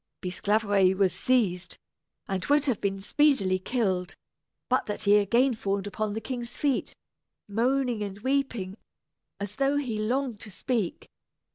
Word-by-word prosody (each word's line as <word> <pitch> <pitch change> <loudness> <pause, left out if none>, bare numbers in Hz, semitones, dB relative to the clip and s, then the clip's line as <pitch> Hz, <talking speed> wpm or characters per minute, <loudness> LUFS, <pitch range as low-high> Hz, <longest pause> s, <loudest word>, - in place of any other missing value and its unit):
Bisclaveret 195 0 +2
was 190 -4 +3
seized, 185 -4 0 0.5
and 190 -1 -2
would 290 0 +3
have 255 -7 0
been 195 -1 -1
speedily 200 -6 +2
killed, 190 -4 -1 0.5
but 255 - +1
that 210 - -4
he 205 0 +6
again 235 +6 +3
fawned 200 -3 -2
upon 205 +1 -2
the 220 - -2
king's 240 0 -6
feet, 280 -3 0 0.5
moaning 245 +2 +1
and 200 -1 -4
weeping 240 -7 -1 0.6
as 200 0 -5
though 275 +1 +2
he 245 -7 -2
longed 245 +1 -1
to 215 - -8
speak. 215 -1 -2
215 Hz, 140 wpm, -27 LUFS, 195-255 Hz, 0.6 s, he